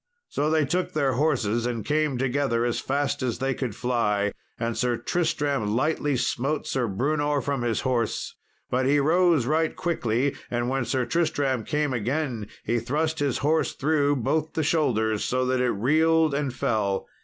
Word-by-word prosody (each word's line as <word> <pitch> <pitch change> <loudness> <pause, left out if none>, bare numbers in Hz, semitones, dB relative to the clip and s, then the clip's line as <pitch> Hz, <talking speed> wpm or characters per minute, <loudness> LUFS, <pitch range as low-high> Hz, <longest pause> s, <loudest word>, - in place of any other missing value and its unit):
So 150 - 0
they 155 -1 +3
took 180 +6 -1
their 140 -4 +1
horses 120 -5 +1
and 115 -4 -3
came 150 -3 +1
together 125 -2 0
as 120 - 0
fast 140 +1 -1
as 125 -3 -1
they 135 0 0
could 125 -6 -4
fly, 105 -5 0 0.3
and 115 0 -1
Sir 125 -1 0
Tristram 145 -6 0
lightly 145 +1 +1
smote 135 +4 -1
Sir 125 -3 -1
Brewnor 145 +7 0
from 140 -2 -2
his 120 -2 0
horse. 120 -4 -1 0.4
But 130 +1 +1
he 145 +2 +4
rose 165 -2 +3
right 160 +3 +1
quickly, 135 -5 0
and 120 0 -1
when 135 -1 0
Sir 130 0 0
Tristram 140 -7 0
came 150 0 -1
again 120 -1 -2 0.2
he 120 +1 0
thrust 155 +7 -1
his 140 -3 0
horse 160 +2 +2
through 145 -1 +1
both 155 +5 -1
the 160 - 0
shoulders, 110 -9 +1
so 130 0 0
that 130 0 +1
it 125 - +2
reeled 155 +7 +3
and 140 -1 -1
fell. 105 -6 -1
135 Hz, 170 wpm, -25 LUFS, 120-150 Hz, 0.4 s, he